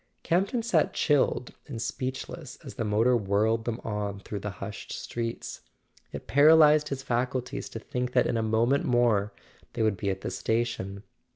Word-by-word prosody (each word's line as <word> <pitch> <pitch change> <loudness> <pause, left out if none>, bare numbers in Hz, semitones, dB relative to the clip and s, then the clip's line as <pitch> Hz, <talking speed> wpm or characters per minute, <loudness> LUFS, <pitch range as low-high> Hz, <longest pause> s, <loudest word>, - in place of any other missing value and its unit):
Campton 195 +7 +1
sat 175 -10 +2
chilled 145 -4 +1
and 125 -6 -6
speechless 130 +2 -5
as - - -7
the - - -3
motor 110 +4 +3
whirled 110 +1 +1
them 120 0 -2
on 105 -2 -3
through 100 +1 -6
the 105 - -4
hushed 100 0 -7
streets. 115 -1 -5 0.5
It - - -7
paralyzed 150 +1 +6
his 135 -1 -4
faculties 125 +1 -2
to - - -7
think 125 +2 -4
that - - +4
in - - 0
a 115 - +1
moment 115 +5 +2
more 115 -4 +2 0.4
they 115 - 0
would 110 -3 +1
be 100 +2 -2
at 95 0 -3
the - - -4
station. 105 -4 -2
115 Hz, 170 wpm, -28 LUFS, 105-130 Hz, 0.5 s, paralyzed